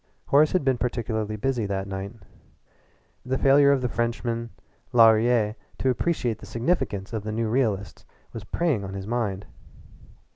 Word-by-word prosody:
Horace 150 +2 +4
had 185 -6 +1
been 130 -3 +2
particularly 110 -3 -2
busy 120 -1 -1
that 100 0 -3
night. 95 +2 -5 1.1
The 130 +1 -1
failure 140 +1 +5
of 140 -2 +2
the 125 - 0
Frenchman 115 0 -2 0.4
Laurier 115 -1 +5 0.2
to 130 - +1
appreciate 125 -5 -1
the 105 - -11
significance 115 - -1
of 110 - -2
the 110 - -4
new 115 +1 -1
realists 110 -6 -1 0.3
was 115 - -7
preying 140 -1 -1
on 95 0 -6
his 95 -1 -5
mind. 105 -4 -2
115 Hz, 150 wpm, -25 LUFS, 105-130 Hz, 1.1 s, failure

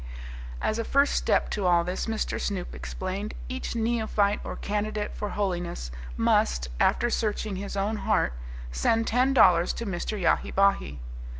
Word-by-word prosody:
As 215 - 0
a - - 0
first 280 +4 +3
step - - +1
to 200 -3 0
all 175 -1 +4
this, 180 +5 -3
Mr. 220 -1 -2
Snoop 195 -4 -3
explained, 195 +3 -5
each 260 -1 -4
neophyte 220 -3 +1
or - - -5
candidate 210 0 -2
for 210 - -3
holiness 175 - -2 0.3
must, - - +2
after 240 - +3
searching 210 -3 -1
his 200 +1 -5
own 205 +3 0
heart, 60 - +1 0.4
send 225 - +2
ten 255 +4 +2
dollars 180 -9 +5
to 235 - -5
Mr. 200 +2 -3
Yahi 175 - +2
Bahi. 195 - +2
205 Hz, 155 wpm, -27 LUFS, 180-220 Hz, 0.4 s, dollars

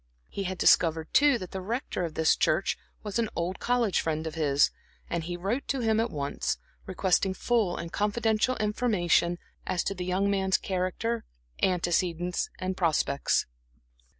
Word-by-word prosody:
He 195 - -4
had 185 0 -3
discovered, 160 -2 +3
too, 290 -3 +5
that 185 -5 -8
the 190 - -4
Rector 225 -1 -3
of 165 -2 -4
this 160 0 +4
church - - +1 0.3
was 210 +1 -2
an 225 -2 0
old 175 +2 -2
college 235 -6 +1
friend 160 0 -2
of 160 - -4
his, 145 -3 +3 0.4
and 170 -1 -2
he 175 +1 -4
wrote 205 +10 -2
to 270 -2 -1
him 220 -1 +2
at 230 +1 +1
once, 140 -5 -2 0.3
requesting 190 0 +1
full 220 -5 +1
and 170 0 -6
confidential 220 +3 +1
information 205 -6 +1 0.3
as 185 -2 0
to - - -1
the 180 -2 -5
young 185 +2 +1
man's 190 -1 +2
character, 195 +5 -2 0.4
antecedents, 175 -1 0
and 185 0 -3
prospects. 155 -5 +1
185 Hz, 160 wpm, -28 LUFS, 170-215 Hz, 0.4 s, too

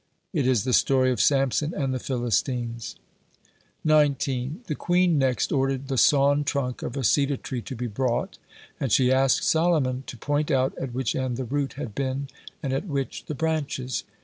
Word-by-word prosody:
"It 145 -7 +1
is 125 -6 +2
the 125 - -1
story 130 0 +3
of 125 - 0
Samson 140 +3 +2
and 135 -3 -1
the 130 - -2
Philistines." 120 -1 -2 0.9
19. 145 - +1
The 155 - -2
queen 175 0 +2
next 130 -2 +1
ordered 135 0 0
the 135 - -1
sawn 145 0 +4
trunk 135 -3 -2
of 125 - -5
a 135 - -2
cedar 140 +4 +2
tree 125 -1 -5
to 130 - -7
be 125 +1 -4
brought, 120 +2 -2 0.4
and 135 - -2
she 130 +2 +4
asked 135 0 +3
Solomon 155 -6 +2
to 120 - -7
point 145 +5 -1
out 130 0 +1
at 125 -3 -5
which 130 -4 -1
end 130 -2 -2
the 130 - -3
root 140 +3 -2
had 125 -6 -6
been 135 +2 -2 0.3
and 135 -2 -1
at 135 +9 -2
which 140 -4 -3
the 150 - -5
branches. 145 -4 -2
135 Hz, 180 wpm, -25 LUFS, 125-145 Hz, 0.9 s, sawn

